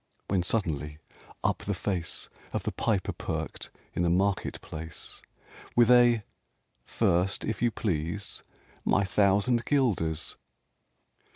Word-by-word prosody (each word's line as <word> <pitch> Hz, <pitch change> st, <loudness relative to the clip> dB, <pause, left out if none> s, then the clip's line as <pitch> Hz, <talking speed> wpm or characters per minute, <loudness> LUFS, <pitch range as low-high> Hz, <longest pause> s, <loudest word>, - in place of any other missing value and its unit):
when 95 Hz, -2 st, +2 dB
suddenly, 75 Hz, -7 st, -1 dB, 0.5 s
up -, -, +1 dB
the 100 Hz, -, -2 dB
face 90 Hz, -2 st, -2 dB, 0.3 s
Of -, -, -1 dB
the -, -, -1 dB
Piper 105 Hz, -5 st, 0 dB
perked -, -, -4 dB, 0.2 s
in -, -, -1 dB
the 85 Hz, -, +3 dB
market 95 Hz, +3 st, +1 dB
place, 80 Hz, +1 st, -7 dB, 0.5 s
With 120 Hz, 0 st, +6 dB
a 120 Hz, -3 st, +6 dB, 0.6 s
"First, 90 Hz, +9 st, +1 dB
if 110 Hz, -2 st, -2 dB
you 120 Hz, -, +4 dB
please, 95 Hz, -2 st, -2 dB, 0.4 s
my 100 Hz, -, +3 dB
thousand 100 Hz, +5 st, +3 dB
guilders!" 95 Hz, -, +1 dB
100 Hz, 115 wpm, -29 LUFS, 85-110 Hz, 0.6 s, With